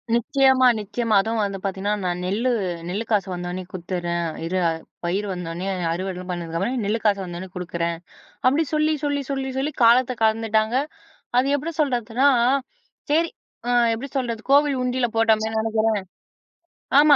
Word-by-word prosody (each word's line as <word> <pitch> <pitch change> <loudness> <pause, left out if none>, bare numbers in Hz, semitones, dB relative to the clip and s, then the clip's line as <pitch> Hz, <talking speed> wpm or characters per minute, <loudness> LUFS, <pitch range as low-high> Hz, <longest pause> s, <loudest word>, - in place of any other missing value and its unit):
நிச்சயமா, 260 +2 +4
நிச்சயமா. 220 +2 -2
அதுவும் 225 +2 -1
வந்து 200 -1 -3
பாத்தீங்கன்னா, 195 +1 -1
"நான் 180 -1 -1
நெல்லு 215 +7 0 0.4
நெல்லு 205 +5 -2
காசு 205 -3 +2
வந்தவோன்னே 180 +1 -4
குடுத்துறேன். 175 -1 -3 0.2
இரு 180 +3 -1 0.5
பயிர் 185 +4 -1
வந்தோனே 175 0 -4 0.3
அறுவடைலாம் 185 +1 -4
பண்ணதுக்கு 170 -2 -3
அப்புறம் 250 +9 -1
நெல்லு 215 +3 0
காசு 205 -2 +3
வந்தவுன்னே 180 +1 -7
குடுக்குறேன்" 170 -1 -2 0.5
அப்படி 280 +5 +4
சொல்லி 305 0 +2
சொல்லி 285 -1 0
சொல்லி 270 -1 -2
சொல்லி 280 +3 0
காலத்த 240 +2 +5
கடந்துட்டாங்க. 220 +1 +2 0.6
அது 260 +2 +3
எப்படி 310 +4 -4
சொல்றதுன்னா, 250 -1 +2 0.8
சரி 330 +2 +3 0.4
அ - - +2 0.2
எப்டி 255 +5 -6
சொல்றது? 235 -4 -1
கோவில் 285 0 +5
உண்டில 250 0 +1
போட்டோமேன்னு 220 0 +2
நெனைக்கிறேன். 220 0 -1 1.2
ஆமா, 295 0 +7
220 Hz, 140 wpm, -23 LUFS, 185-255 Hz, 1.2 s, ஆமா